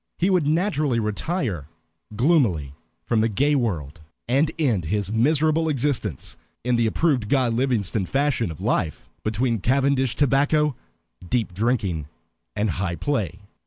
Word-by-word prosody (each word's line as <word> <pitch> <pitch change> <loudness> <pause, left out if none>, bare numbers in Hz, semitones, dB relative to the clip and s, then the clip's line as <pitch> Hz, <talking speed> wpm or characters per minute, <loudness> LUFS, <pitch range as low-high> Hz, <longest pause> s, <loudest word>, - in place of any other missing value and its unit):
He 185 +3 +2
would 175 -6 +2
naturally 155 - +1
retire 105 - -2 0.5
gloomily 110 - +2 0.3
from 115 -2 +2
the 115 - +2
gay 140 +8 +2
world, 80 - -2 0.3
and 140 +6 +3
end 120 - +1
his 100 +3 -1
miserable 155 +7 +2
existence 130 - -1 0.3
in 125 0 +1
the 115 -1 +2
approved 125 -3 +1
Guy 130 -3 +3
Livingstone 115 -5 0
fashion 135 -6 0
of 80 - -8
life, 80 - -2
between 115 +2 0
cavendish 135 +2 +1
tobacco, 145 +1 +2 0.5
deep 115 -6 0
drinking, 100 - -1 0.5
and 105 -1 0
high 90 -1 -2
play. 100 - -2
120 Hz, 130 wpm, -23 LUFS, 105-145 Hz, 0.5 s, and